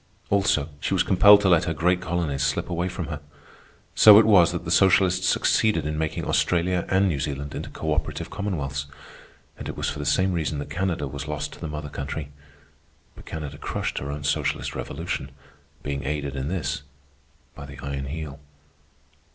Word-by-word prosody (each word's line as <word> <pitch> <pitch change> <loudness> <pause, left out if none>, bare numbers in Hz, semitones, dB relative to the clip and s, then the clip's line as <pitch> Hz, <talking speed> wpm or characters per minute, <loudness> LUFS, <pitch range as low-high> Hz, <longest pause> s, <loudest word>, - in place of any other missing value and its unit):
Also, 100 -7 +2
she - - -1
was - - +3
compelled 100 +2 +7
to 100 - +1
let 85 -3 +4
her 80 - -2
great 90 +3 +2
colonies 85 -6 -2
slip - - -1
away 85 +1 -1
from 90 -2 -4
her. 75 -2 -5 0.7
So 105 -1 +9
it 110 - +7
was 95 -6 +6
that - - -5
the - - -3
socialists 95 -1 +4
succeeded 105 -9 +2
in 75 +1 -2
making 80 0 -2
Australia 90 0 +1
and 95 +1 +3
New 80 -7 -1
Zealand 70 0 -4
into - - -5
cooperative 80 0 -3
commonwealths. 70 -9 -3 0.7
And - - -6
it - - -6
was - - -1
for - - -7
the - - -4
same 95 0 +2
reason 80 -3 -1
that 70 - -6
Canada 90 -5 -1
was 70 +2 -6
lost 75 0 -4
to - - -13
the 80 - -3
mother 75 -1 -5
country. 70 +1 -5 0.9
But - - -14
Canada 75 -2 -6
crushed - - -3
her 70 - -6
own 75 0 -6
socialist 70 - -1
revolution, 85 +5 -4 0.5
being 70 -1 -3
aided 70 0 -3
in 65 0 -3
this 85 -4 -2 0.7
by 70 - -10
the 70 - -11
Iron 70 -1 -4
Heel. 75 0 -6
80 Hz, 185 wpm, -25 LUFS, 70-90 Hz, 0.9 s, So